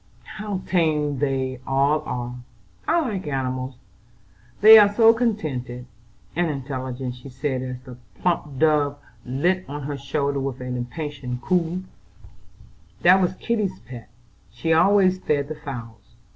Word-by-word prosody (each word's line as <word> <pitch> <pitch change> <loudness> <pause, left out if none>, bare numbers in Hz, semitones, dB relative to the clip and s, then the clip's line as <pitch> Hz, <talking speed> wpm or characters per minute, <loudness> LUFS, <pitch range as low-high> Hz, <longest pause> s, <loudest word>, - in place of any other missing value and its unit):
"How 210 -3 -3
tame 150 -6 +1
they 130 -2 -1
all 140 +3 +2
are! 120 0 -3 0.5
I 340 - +3
like 205 - -3
animals, 130 -1 -2 0.9
they 220 +1 +11
are 205 -1 +6
so 225 +2 +6
contented 140 - -2 0.5
and 175 0 +1
intelligent," 130 -2 -4
she 125 +2 -11
said, 130 0 -2
as 130 0 -7
a 125 -1 -10 0.2
plump 150 -6 -1
dove 150 -1 +2 0.3
lit 175 +9 +1
on 145 +1 -6
her 145 0 -4
shoulder 140 0 -1
with 135 -1 -3
an 125 0 -4
impatient 125 0 -5
coo. 180 0 0 1.2
"That 185 +2 +7
was 180 0 +1
Kitty's 215 - -1
pet, 120 +1 -11 0.4
she 120 - -1
always 185 +2 +4
fed 145 -4 0
the 155 - -4
fowls. 115 -8 -9
145 Hz, 135 wpm, -23 LUFS, 130-180 Hz, 1.2 s, they